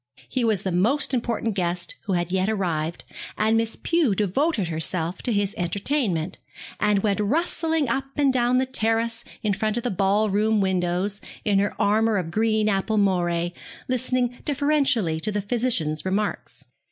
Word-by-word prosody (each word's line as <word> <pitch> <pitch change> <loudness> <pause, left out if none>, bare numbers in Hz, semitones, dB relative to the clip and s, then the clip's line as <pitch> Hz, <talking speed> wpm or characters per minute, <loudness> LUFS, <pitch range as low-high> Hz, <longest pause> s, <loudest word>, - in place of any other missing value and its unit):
He 255 - -1
was 215 -4 +1
the 190 - -1
most 240 +12 +2
important 230 -2 -1
guest 175 -2 -1
who 200 - -1
had 175 0 -1
yet 190 +2 +1
arrived, 170 -6 -2 0.3
and 220 +1 +2
Miss 225 0 +1
Pew 325 - +1
devoted 210 - 0
herself 165 +2 -2
to 245 - -1
his 205 -1 0
entertainment, 185 - -1 0.4
and 210 -2 +2
went 205 -1 +1
rustling 320 - +1
up 265 +4 -1
and 280 -2 +3
down 245 0 +2
the 260 - +2
terrace 230 -1 0 0.2
in 210 -2 +1
front 215 +3 -1
of 240 - -2
the 245 - -1
ballroom 205 +3 +2
windows 190 +1 0 0.2
in 200 -2 +3
her 205 +1 -1
armour 215 +1 +3
of 180 - -1
apple 165 - -8
green 220 +2 +1
moiré, 185 -4 +1 0.3
listening 255 -1 -1
deferentially 280 - +1
to 215 - -1
the 205 - -1
physician's 200 -8 0
remarks. 200 +3 -3
210 Hz, 160 wpm, -24 LUFS, 185-240 Hz, 0.4 s, and